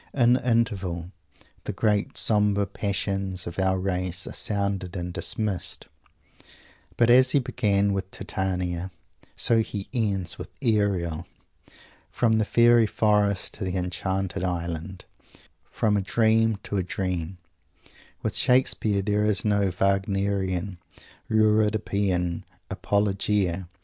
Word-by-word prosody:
In 120 -3 +5
the 125 0 0
interval 95 -7 -1 0.5
the - - -2
great 105 -2 0
sombre 105 -2 +3
passions 95 -2 -3
of 85 +2 -6
our 95 0 +2
race 90 -1 -1
are - - -7
sounded 100 -3 -1
and 90 -1 -4
dismissed; 105 -3 -2 1.1
but 120 0 +4
as 130 +1 +6
he - - +5
began 105 -6 +1
with 95 -1 -3
Titania, 90 -2 -3 0.5
so 115 - +3
he 105 -3 -4
ends 100 -7 -1
with - - -7
Ariel. 95 -7 0 0.8
From 110 -2 +2
the 110 - +1
fairy 120 0 +5
forest 105 -3 +1
to - - -6
the 95 0 -2
enchanted 95 +1 -2
island; 85 0 -4 0.6
from 105 -2 +1
a 100 - +1
dream 110 +2 +2
to 100 - -3
a 95 - 0
dream. 90 -1 -3 0.9
With - - -2
Shakespeare 120 -6 +2
there 105 +1 +1
is 105 -3 0
no 100 -2 +2
Wagnerian, 95 -1 0 0.5
Euripidean 105 -5 +1 0.3
"apologia." 100 -3 0
100 Hz, 120 wpm, -25 LUFS, 90-105 Hz, 1.1 s, as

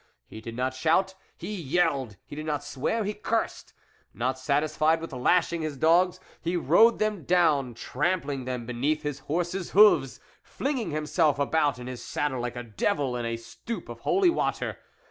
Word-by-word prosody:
He 110 - -10
did 115 0 -7
not 130 +1 -1
shout, 165 +8 +2 0.2
he 210 - -6
yelled; 140 - 0
he - - -9
did 155 +1 -6
not 145 -2 -1
swear, 145 - -2
he 205 +1 -2
cursed. 225 +2 -2 0.4
Not 130 +2 -1
satisfied 155 +4 +1
with 165 -3 -7
lashing 170 +6 +2
his 155 -3 -4
dogs, 175 +5 +3 0.2
he 175 +1 -1
rode 175 - +5
them 215 -5 -1
down, 150 -9 +2
trampling 145 0 -2
them 125 -2 -4
beneath 130 +6 -1
his 145 -2 -3
horse's 175 +5 -3
hoofs, 210 0 +6 0.2
flinging 265 - -3
himself 155 0 +1
about 145 -1 +1
in 125 - -8
his 125 -1 -7
saddle 140 -4 -2
like 120 0 -4
a 120 - -5
devil 130 - -1
in 120 -1 -3
a 115 0 -2
stoup 175 - -7
of 120 -1 -8
hoi 370 - +3
water. - - -2
150 Hz, 170 wpm, -27 LUFS, 130-175 Hz, 0.4 s, hoofs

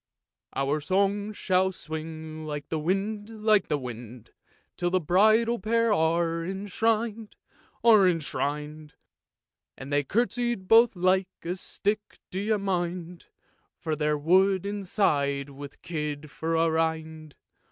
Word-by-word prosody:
" - - -65
Our 140 +3 0
song 200 +5 0
shall 190 -2 +1
swing 155 -1 -7
like 145 -1 -5
the 160 - -1
wind, 200 +6 -2
like 215 -3 +4
the 150 - 0
wind, 120 -2 -9 0.4
Till 175 0 -1
the 185 +1 +2
bridal 220 +8 +3
pair 230 +2 +2
are 165 -1 +1
enshrin'd, 215 +4 -1 0.5
are 215 -5 +7
enshrin'd, 150 -2 -3 0.8
And 135 +2 -7
they 145 0 +3
curtsey 240 - 0
both 225 +4 +4
like 185 +1 +2 0.2
a 175 +2 -2
stick, 210 +3 -3
do 185 - -3
you 215 +2 +1
mind? 180 -3 -3 0.5
For 160 -2 -2
they're 150 0 0
wood 190 +5 +3
inside 150 -9 0
with 140 +1 -11
kid 150 -3 -4
for 165 +1 -2
a 165 0 +3
rind. 160 -1 -2
175 Hz, 130 wpm, -27 LUFS, 155-205 Hz, 0.8 s, are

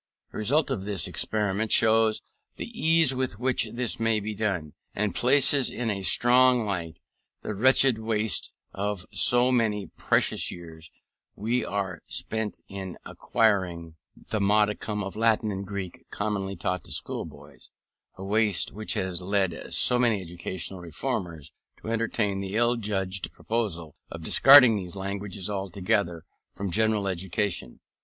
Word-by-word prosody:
The - - -7
result 140 +7 +1
of 115 -8 -2
the 100 -1 -3
experiment 105 0 -1
shows 110 0 +3 0.3
the - - -6
ease 160 -3 +3
with 130 -5 -2
which 125 -1 0
this 120 0 -2
may 115 -1 +2
be 105 +1 -5
done, 95 -8 -3 0.2
and 105 0 -1
places 135 +1 +3
in 115 -2 -2
a 100 -1 -4
strong 125 +3 +4
light 85 -5 -4 0.4
the - - -4
wretched 130 +2 +4
waste 110 -4 -1 0.2
of 100 -2 -3
so 120 +5 +4
many 110 -5 0
precious - - +1
years 80 -2 -10 0.5
as 115 +4 0
are 95 -3 -3
spent 110 -2 -3
in 95 -2 -7
acquiring 90 -7 -1 0.2
the 110 - -4
modicum 105 +1 +1
of 95 - -6
Latin 110 -1 +1
and 95 0 -5
Greek 100 -3 -6
commonly 100 -2 -3
taught 90 +1 -3
to - - -10
schoolboys; 75 -2 -6 0.5
a 95 - -9
waste 105 -3 +1
which 110 +1 -3
has 95 -1 -2
led 95 -2 -2
so 125 - +5
many 115 -4 +2
educational 90 +1 -6
reformers 85 -2 -5 0.3
to - - -8
entertain 110 -3 -1
the 95 +1 -5
ill 120 +1 +3
judged 100 -4 -3
proposal 90 -9 -3
of 85 -1 -8
discarding 130 - +8
these 90 -1 -5
languages 100 -1 -4
altogether 95 -3 -2 0.3
from 100 -2 -4
general 110 +1 +1
education. 95 -6 -3
105 Hz, 140 wpm, -26 LUFS, 95-110 Hz, 0.5 s, discarding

